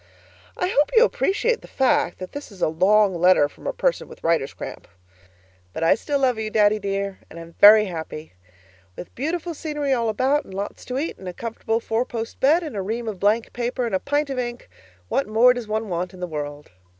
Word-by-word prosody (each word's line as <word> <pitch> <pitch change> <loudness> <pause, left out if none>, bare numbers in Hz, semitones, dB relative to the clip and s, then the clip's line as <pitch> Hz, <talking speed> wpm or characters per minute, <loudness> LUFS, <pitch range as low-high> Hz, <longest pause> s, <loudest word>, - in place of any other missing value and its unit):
I 360 - 0
hope 295 -5 +2
you 460 - +8
appreciate 455 +4 0
the - - -13
fact 290 +2 +1
that 185 0 -8
this 285 -5 -8
is 195 - -14
a - - +4
long 190 +5 +3
letter 175 -3 +4
from - - -12
a - - +1
person - - -1
with - - -14
writer's 165 -4 +1
cramp. - - -9 0.9
But 165 - -3
I 165 - +5
still 290 -2 -2
love 255 -4 +1
you, 215 -1 -3
Daddy 215 0 +3
dear, 195 -1 -3
and 170 - -10
I'm 165 0 -11
very 210 +1 +9
happy. 160 - -7 0.6
With 175 - -10
beautiful 335 +5 -3
scenery 295 -3 -2
all 235 -3 0
about, 265 +7 +1
and 190 - -11
lots 200 +1 -5
to 255 - -4
eat 310 +5 -3
and 190 - -9
a - - -7
comfortable 225 +1 -3
four 225 +1 -1
post 230 -2 -6
bed 315 +6 +4
and 300 -8 -6
a 200 - -2
ream 225 +4 -4
of 205 -4 -4
blank 215 +3 +1
paper 245 +1 -2
and 230 - -4
a 190 - +2
pint 290 +3 -1
of 260 - -2
ink 240 -1 -5 0.4
what 275 - 0
more 230 +4 +5
does 245 -3 -6
one 220 +1 -2
want 180 0 -3
in - - -13
the 180 - -2
world? 150 -3 -6
225 Hz, 220 wpm, -23 LUFS, 190-270 Hz, 0.9 s, very